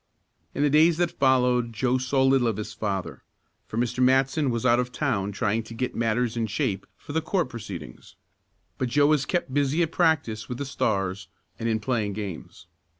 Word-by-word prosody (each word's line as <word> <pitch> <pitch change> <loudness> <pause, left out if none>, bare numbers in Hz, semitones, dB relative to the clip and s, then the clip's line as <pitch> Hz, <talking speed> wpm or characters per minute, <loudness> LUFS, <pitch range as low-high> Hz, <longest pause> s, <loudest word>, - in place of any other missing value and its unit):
In 145 - +1
the 145 - +4
days 160 +2 +5
that 175 -1 +1
followed 125 -3 +2
Joe 125 +3 +1
saw 130 +1 +1
little 135 -2 +4
of 110 -3 -1
his 105 0 -5
father, 100 -4 -3 0.5
for 110 - -6
Mr. 120 +1 -1
Matson 135 +2 +3
was 115 0 -2
out 120 -1 +4
of 125 0 -2
town 110 -8 -1
trying 110 +1 0
to 115 +1 -10
get 125 +2 -2
matters 115 +1 0
in 115 -1 -1
shape 100 -2 -2
for 145 - -9
the 160 - +1
court 170 -2 -1
proceedings. 95 - -9 0.6
But 130 - 0
Joe 145 +4 +4
was 150 -2 +2
kept 175 -7 -1
busy 145 +4 +2
at 160 - -2
practice 130 -12 +1
with 125 - -4
the 140 - -4
Stars, 95 -7 -1 0.3
and 115 - -1
in 110 -1 +1
playing 110 -2 -1
games. 100 -5 -7
125 Hz, 195 wpm, -26 LUFS, 110-135 Hz, 0.6 s, days